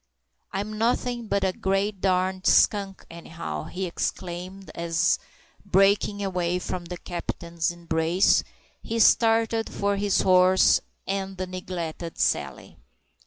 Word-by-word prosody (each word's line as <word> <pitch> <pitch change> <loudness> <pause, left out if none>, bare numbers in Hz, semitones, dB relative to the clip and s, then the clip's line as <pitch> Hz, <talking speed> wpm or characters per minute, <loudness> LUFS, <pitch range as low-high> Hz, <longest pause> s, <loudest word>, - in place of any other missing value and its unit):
"I'm 210 +2 -4
nothin' 240 0 0
but 200 -1 0
a 190 -1 +1
great 195 +1 -1
darn 185 0 +1
skunk, 195 -2 +3
any 170 0 -11
how!" 75 - -5
he 190 +1 -4
exclaimed, 180 +2 -5
as, 170 0 +1 0.4
breaking 200 +1 +2
away 180 -2 -1
from 180 -1 -5
the 175 +1 -6
captain's 170 -1 -3
embrace, 170 +1 +2 0.4
he 230 - -4
started 225 0 +3
for 200 0 0
his 200 -1 +2
horse 185 0 +5 0.2
and 195 0 -3
the 185 - -2
neglected 175 -2 -6
Sally. - - -1
185 Hz, 120 wpm, -25 LUFS, 175-200 Hz, 0.4 s, horse